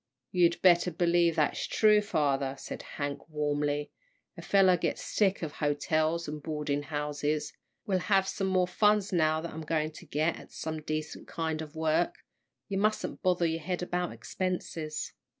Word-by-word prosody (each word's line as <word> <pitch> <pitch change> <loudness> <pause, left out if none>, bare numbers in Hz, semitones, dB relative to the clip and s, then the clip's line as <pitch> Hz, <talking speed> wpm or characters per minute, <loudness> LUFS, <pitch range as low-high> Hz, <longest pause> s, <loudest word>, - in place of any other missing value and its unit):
"You'd 175 -1 +3
better 175 -1 +6
believe 170 0 +2
that's 150 - +1
true, 210 -1 +5
father," 140 -8 0
said - - -7 0.2
Hank, 145 +1 -4
warmly; 145 -1 -1 0.4
"a - - -8
fellow 190 -2 +5
gets 175 - -2
sick 195 -3 +1
of 155 - -3
hotels 155 +2 0
and 150 0 -5
boarding 150 -2 -2
houses. 150 0 -2 0.3
We'll 190 -2 +1
have 195 +1 +2
some 195 0 -1
more 185 -1 +3
funds 210 +2 +2
now 155 -2 +2
that 170 - -6
I'm 160 - -6
going 155 0 -1
to 155 - -13
get 155 +3 0
at - - -13
some 155 -1 -4
decent 155 +1 -4
kind 160 -1 -2
of 155 0 -8
work. 160 +2 +1 0.5
You 195 -2 -1
mustn't 215 +1 0
bother 180 -2 +2
your 165 0 0
head 180 +1 -2
about 180 0 -1
expenses." 165 -4 -4
160 Hz, 165 wpm, -30 LUFS, 150-180 Hz, 0.5 s, better